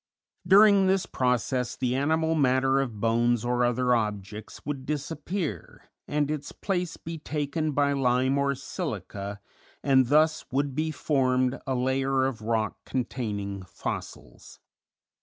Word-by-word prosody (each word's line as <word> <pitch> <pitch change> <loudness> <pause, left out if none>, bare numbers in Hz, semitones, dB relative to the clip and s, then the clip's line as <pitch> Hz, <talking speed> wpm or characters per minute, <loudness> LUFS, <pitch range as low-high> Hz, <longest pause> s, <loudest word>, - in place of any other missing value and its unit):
During 200 0 +7
this 190 0 +2
process 125 0 0
the 125 -1 -1
animal 160 +4 +1
matter 135 -2 +3
of 120 -6 -3
bones 120 +1 +2
or 125 0 +1
other 125 +1 +2
objects 105 -2 -3
would 140 -3 -4
disappear 150 - -4 0.2
and 145 0 0
its 150 -2 -4
place 180 -4 -2
be 165 0 -7
taken 150 +1 -2
by 140 0 +2
lime 130 0 +2
or 140 0 +1
silica, 100 - -5 0.4
and 130 -2 +4
thus 155 +3 +3
would 140 +1 0
be 155 +3 -1
formed 130 -4 +1
a 130 - 0
layer 130 +1 +1
of 125 -4 -3
rock 110 -1 -1
containing 105 -6 -3
fossils. - - -7
130 Hz, 130 wpm, -27 LUFS, 120-150 Hz, 0.4 s, During